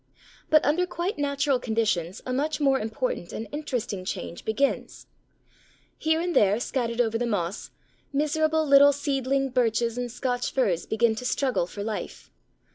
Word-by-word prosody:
But 310 -1 +5
under 345 +5 +2
quite 360 +3 -3
natural 280 -2 +1
conditions 215 -7 -1
a 255 - -2
much 300 +4 -1
more 275 -2 +3
important 220 -4 -3
and 220 - -5
interesting 245 -10 -3
change 185 -2 -5
begins. 275 +6 -1 0.9
Here 320 0 +1
and 350 0 -2
there 205 +2 +4
scattered 240 -2 -2
over 225 -1 +1
the 245 - 0
moss, 195 -4 -2 0.4
miserable 310 +2 +1
little 285 0 +7
seedling 275 -1 0
Birches 235 -1 +1
and 245 -1 -3
Scotch 245 0 -2
Firs 200 -11 0
begin 225 +1 +2
to 220 - -6
struggle 255 -9 0
for 200 +2 -6
life. 215 0 -6
250 Hz, 150 wpm, -26 LUFS, 220-285 Hz, 0.9 s, little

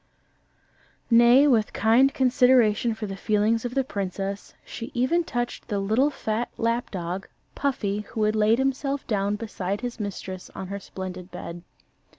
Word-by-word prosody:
Nay, 240 +4 +7
with 230 -7 +2
kind 240 +5 +4
consideration 250 -4 +3
for 220 - -5
the 195 -1 -5
feelings 215 +3 +1
of 245 +1 -4
the 270 - +2
princess, 195 -2 -4
she 230 0 -7
even 260 +8 +2
touched 240 -6 -4
the 205 - -2
little 220 +8 +2
fat 230 -4 -2
lap 230 +1 0
dog, 180 0 -4 0.3
Puffy, 210 -8 -1
who 220 -3 -2
had 215 +1 +2
laid 215 +1 +4
himself 270 +1 -1
down 205 -2 0
beside 205 -2 -4
his 245 -1 -5
mistress 190 -2 -6
on 190 - -6
her 200 0 -4
splendid 185 -2 -7
bed. 175 -1 -7
220 Hz, 155 wpm, -25 LUFS, 200-245 Hz, 0.3 s, Nay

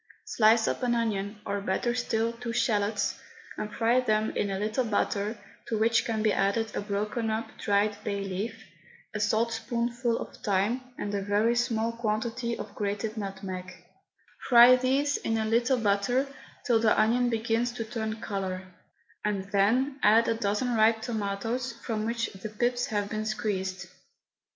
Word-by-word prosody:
Slice 225 0 +4
up - - -1
an 245 -1 +1
onion, 210 -2 -1
or 200 0 -2
better 220 +5 0
still 230 -2 0
two 235 0 -5
shallots, 210 -3 0 0.4
and 210 - -5
fry 235 +2 +2
them 215 -3 +1
in 205 - -1
a 195 - -2
little 215 +5 0
butter, 210 -1 -1 0.3
to 225 - -1
which 225 +1 +3
can 220 -2 -1
be 215 - +3
added 210 +3 0
a - - -1
broken 210 +3 -2
up, 220 +1 -2
dried 205 0 +1
bay 200 -2 -2
leaf, 205 +4 -4 0.5
a 210 - -3
saltspoonful 235 +2 0
of - - -7
thyme, 210 +4 0 0.2
and 205 - -4
a 200 - 0
very 205 +4 +2
small 230 -1 0
quantity 230 +1 -2
of - - -7
grated 210 +2 -2
nutmeg, 190 -3 -5 0.8
Fry 245 0 +9
these 270 +3 +1
in 225 - -1
a 220 - 0
little 235 +4 +2
batter 225 +4 +1 0.4
till 235 -3 +3
the 220 -1 +3
onion 245 +3 +3
begins 230 +1 0
to 235 - -3
turn 220 -1 -4
colour, 190 -3 -3 0.6
and 200 -2 -2
then 250 +8 +2
add 225 +2 +5
a - - +3
dozen 225 +3 -1
ripe 220 0 +3
tomatoes 225 +2 -2
from 225 -2 -4
which 230 0 -2
the 195 +3 -7
pips 245 +3 0
have 205 -1 -1
been 215 +1 -3
squeezed. 190 -5 -2
220 Hz, 160 wpm, -28 LUFS, 205-235 Hz, 0.8 s, Fry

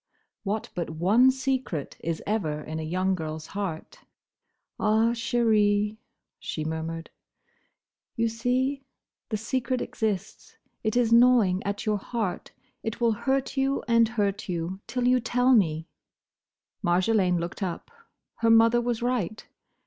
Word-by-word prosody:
What 215 +1 -3
but 175 -2 -3
one 195 +11 +4
secret 260 - -2
is 165 0 -3
ever 160 -8 -1
in 155 +1 -5
a - - -3
young 185 +4 0
girl's 160 -3 -4
heart? 190 -5 -5 0.8
"Ah, 220 +2 +3
chérie," 215 -3 +2 0.4
she 205 -7 -4
murmured, 160 +1 -4 1.0
"you 230 -1 +1
see? 255 +4 -1 0.5
The 215 - -1
secret 255 +3 -1
exists: 215 -4 -4 0.3
it 220 +1 0
is 235 -2 +3
gnawing 230 -6 +5
at 200 0 -3
your 210 -1 +1
heart. 210 -3 -3 0.3
It 225 +1 -4
will 235 -1 +3
hurt 265 +5 -1
you 270 +1 +1
and 230 -1 +5
hurt 205 -4 -1
you, 175 +2 -3
till 250 -1 -1
you 250 0 +4
tell 250 +2 +2
me." 165 -7 +2 1.0
Marjolaine 180 0 +2
looked 170 +4 -5
up. 185 - -4 0.5
Her 230 - +2
mother 230 +1 +6
was 240 -1 -2
right. 225 -4 -1
215 Hz, 135 wpm, -26 LUFS, 180-240 Hz, 1.0 s, mother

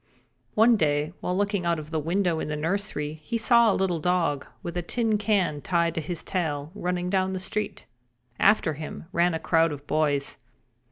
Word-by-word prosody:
One 225 +2 +6
day, 150 -1 +1
while 180 - -2
looking 200 -2 0
out 170 -1 +1
of 155 0 -8
the 160 - 0
window 170 +1 0
in - - -3
the 150 - -2
nursery 160 -3 -2
he 230 +9 -2
saw 235 -1 +5
a - - +1
little 180 -3 0
dog, 165 -4 0 0.2
with 170 - -5
a 175 - 0
tin 220 +4 0
can 190 -8 +1
tied 170 -2 +1
to 165 - -2
his 165 +2 -5
tail, 155 -5 -2
running 180 -2 -2
down 190 -1 +1
the 185 - -2
street. 210 +3 -4 0.5
After 200 -6 +4
him 155 +2 -7
ran 175 -1 +2
a - - -2
crowd 165 -1 +2
of 145 -1 -7
boys. 145 -3 0
175 Hz, 190 wpm, -26 LUFS, 155-195 Hz, 0.5 s, One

